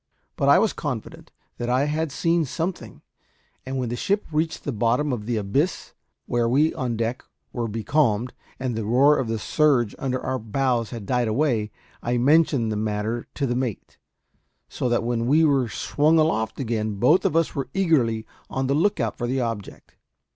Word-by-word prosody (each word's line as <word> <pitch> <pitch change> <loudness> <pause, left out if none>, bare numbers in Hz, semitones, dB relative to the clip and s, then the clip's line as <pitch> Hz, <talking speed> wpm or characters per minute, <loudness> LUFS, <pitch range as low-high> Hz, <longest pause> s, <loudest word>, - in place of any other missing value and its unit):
But - - +1
I - - +7
was - - +2
confident - - -6 0.3
that 120 0 -2
I 130 +2 +2
had 155 +1 -1
seen 165 +3 +1
something; 165 +6 -5 0.6
and 135 0 -3
when 125 -3 -2
the 120 - -2
ship 200 +10 0
reached 160 +1 -1
the 145 - -2
bottom 120 +5 +1
of 105 -3 -5
the 120 -2 0
abyss, 110 - -1 0.3
where 120 -1 0
we 150 +6 +3
on 120 -3 -2
deck 115 +2 -2 0.3
were 120 -2 -2
becalmed, 115 +1 0 0.3
and 130 -1 -2
the 110 - -2
roar 130 +7 +4
of 130 - -1
the 115 0 -1
surge 125 -2 +2
under 130 -2 -1
our 130 0 -2
bows 120 +1 0
had 115 -4 -7
died 125 +1 +1
away, 110 -3 +1 0.3
I 120 +1 0
mentioned 140 -3 +3
the - - -1
matter 110 +2 -2
to 140 - -1
the 120 - 0
mate; 125 -5 -4 0.7
so 125 - -2
that 120 -1 +1
when 115 0 -1
we 155 +4 +5
were 135 -5 +2
swung 150 +9 +2
aloft 155 -9 +1
again 110 -4 -2
both 125 - +4
of - - 0
us 165 -1 +2
were 135 -3 -3
eagerly 130 -12 +2 0.2
on 135 0 -2
the 135 - +1
lookout 150 - 0
for 120 - -1
the 130 +1 0
object. 115 -5 -6
125 Hz, 185 wpm, -24 LUFS, 115-150 Hz, 0.7 s, I